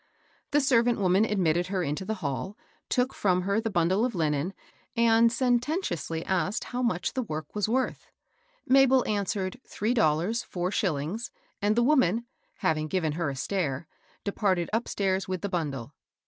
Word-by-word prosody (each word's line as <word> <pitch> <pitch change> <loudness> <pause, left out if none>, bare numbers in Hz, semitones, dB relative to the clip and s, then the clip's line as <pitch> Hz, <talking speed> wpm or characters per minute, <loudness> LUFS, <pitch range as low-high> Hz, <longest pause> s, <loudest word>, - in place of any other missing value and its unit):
The 295 0 +3
servant 240 -3 +3
woman 190 +2 +3
admitted 175 -5 +1
her 185 -1 -1
into 150 +5 -3
the 220 +2 -2
hall, 145 +9 -3 0.3
took 255 +1 +1
from 185 -2 +1
her 200 +3 +1
the 225 - -2
bundle 185 +2 +2
of 245 -3 0
Unen, 155 +1 0 0.5
and 230 0 +5
senten 250 +6 +1
tiously 165 - -3
asked 190 +4 0
how 250 0 -4
much 225 -8 0
the 260 - -1
work 155 - -5
was 210 0 0
worth. 260 +3 -1 0.6
Mabel 265 -1 +5
answered 200 +1 -2
three 220 +4 -1
dollars 175 +3 +2
four 180 0 -3
shillings, 185 +2 -1 0.3
and 205 +1 +2
the 240 - +3
woman, 235 - +3 0.4
having 155 -1 +1
g?ven 165 -4 0
her 160 0 -1
a 135 - -4
stare, 150 -1 -2 0.4
departed 195 -4 0
upstairs 195 -4 0
with 185 -1 -3
the 200 - -2
bundle. 145 - -3
195 Hz, 160 wpm, -28 LUFS, 170-230 Hz, 0.6 s, and